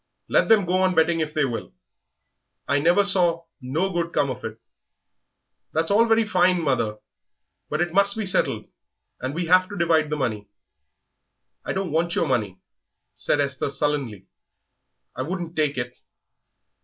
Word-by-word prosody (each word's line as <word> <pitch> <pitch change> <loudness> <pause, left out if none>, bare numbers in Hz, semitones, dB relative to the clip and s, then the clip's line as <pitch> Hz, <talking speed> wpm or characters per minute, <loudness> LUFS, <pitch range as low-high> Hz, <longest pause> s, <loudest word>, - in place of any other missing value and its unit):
Let - - +2
them 215 -4 +5
go 180 +1 +1
on 185 -1 +2
betting 165 +1 +3
if 155 -1 -3
they 155 -2 +2
will; 115 - -6 0.9
I 140 +2 +2
never 175 +7 +3
saw 175 -4 +3 0.2
no 160 +10 -1
good 170 -1 -2
come 140 - +1
of 125 0 -8
it." 110 0 -6 1.1
"That's 160 +3 0
all 225 +3 +4
very 225 0 +3
fine, 185 -3 +2
mother; 120 -9 -1 0.7
but 155 +2 -1
it 175 -1 -1
must 200 +2 +4
be 215 - -2
settled, 185 - +1 0.5
and 130 +3 -4
we 175 +1 -2
have 185 +2 +4
to 205 - -7
divide 160 -3 +2
the 150 - -1
money." 110 -7 -3 1.2
"I - - -3
don't 190 -4 -3
want 170 +2 0
your 165 - +1
money," 105 -8 -1 0.6
said 145 - -1
Esther, 140 -1 -1
sullenly; 140 -9 -2 0.9
"I 130 - -4
wouldn't 170 +3 -5
take 150 -3 0
it." 120 0 -5
160 Hz, 160 wpm, -23 LUFS, 135-185 Hz, 1.2 s, them